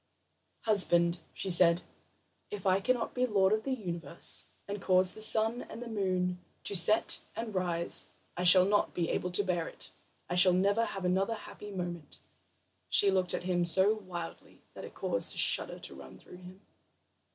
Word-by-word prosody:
"Husband," 175 -5 +1
she 190 - -4
said, 170 0 +4 0.7
"if 205 -2 -8
I 190 0 +2
cannot 245 +3 -2
be 250 0 0
lord 200 -3 +2
of 215 - 0
the 270 - -6
universe, 170 - -1 0.2
and 200 0 -6
cause 185 0 +2
the 215 - -11
sun 220 +2 +4
and 230 - -9
moon 185 -3 -2 0.2
to 200 - -3
set 190 +5 +3
and 225 0 -6
rise, 175 -2 +1 0.3
I 180 - -4
shall 180 +1 +7
not 205 +1 0
be 170 -2 -2
able 180 - -2
to 180 +3 +2
bear 175 -3 -2
it. - - -7 0.4
I - - -5
shall 180 0 +6
never 200 +5 +1
have 195 -4 -6
another 195 +5 0
happy 210 -1 -11
moment." 175 -5 -7 0.7
She 200 - +4
looked 185 -2 0
at - - -5
him 180 -1 -1
so 190 +5 +5
wildly 180 -6 -9
that - - -9
it - - -13
caused - - -3
a - - -9
shudder - - +3
to - - -9
run - - -13
through - - -15
him. 185 +1 -14
185 Hz, 175 wpm, -30 LUFS, 180-205 Hz, 0.7 s, shall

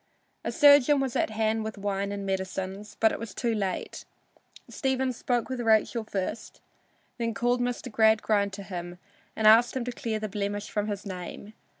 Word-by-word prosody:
A - - -2
surgeon 290 -2 +6
was 265 -3 -2
at - - +1
hand 220 0 0
with 220 -1 -5
wine 200 0 -2
and 200 -1 -4
medicines, 190 +2 -4
but 220 - +4
it - - -4
was 225 -4 -7
too 235 -2 0
late. 195 -4 -3 0.6
Stephen 265 -1 -1
spoke 240 0 -1
with 260 -2 -4
Rachel 225 0 +2
first, 205 +1 -5 0.6
then 230 -2 -1
called 245 +3 +1
Mr. 245 0 -3
Gradgrind 220 -2 +3
to 200 0 -7
him 175 -2 -6 0.4
and 220 - -1
asked 225 +4 +6
him 245 - -3
to 250 - -3
clear 230 -2 -3
the 215 0 -3
blemish 205 0 -4
from 210 0 -1
his 205 -1 -4
name. 190 +2 -7
215 Hz, 180 wpm, -27 LUFS, 200-240 Hz, 0.6 s, surgeon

